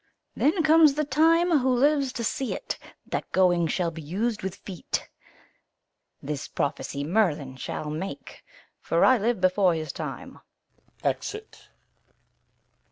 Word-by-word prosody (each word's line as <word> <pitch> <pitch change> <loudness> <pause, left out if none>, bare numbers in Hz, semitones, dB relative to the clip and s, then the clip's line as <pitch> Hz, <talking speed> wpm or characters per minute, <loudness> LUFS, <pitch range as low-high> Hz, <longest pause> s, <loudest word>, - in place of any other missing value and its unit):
Then 325 +4 +2
comes 315 -2 +6
the 305 - +1
time, 325 +3 +3
who 260 0 +1
lives 275 +2 +2
to 235 - -4
see't, 265 +3 -3 0.3
That - - -4
going 175 -3 +3
shall 170 +1 -1
be 165 0 -8
us'd 210 +9 -2
with 190 0 -4
feet. 190 -3 -5 1.2
This 145 0 -4
prophecy 140 0 -3
Merlin 155 -7 0
shall 150 +3 -5
make, 180 +6 -7 0.4
for - - +2
I 260 -2 +5
live 230 +1 0
before 185 -1 +3
his 155 -1 -4
time. - - -7 0.6
Exit. 430 +1 -4
205 Hz, 125 wpm, -26 LUFS, -, 1.2 s, comes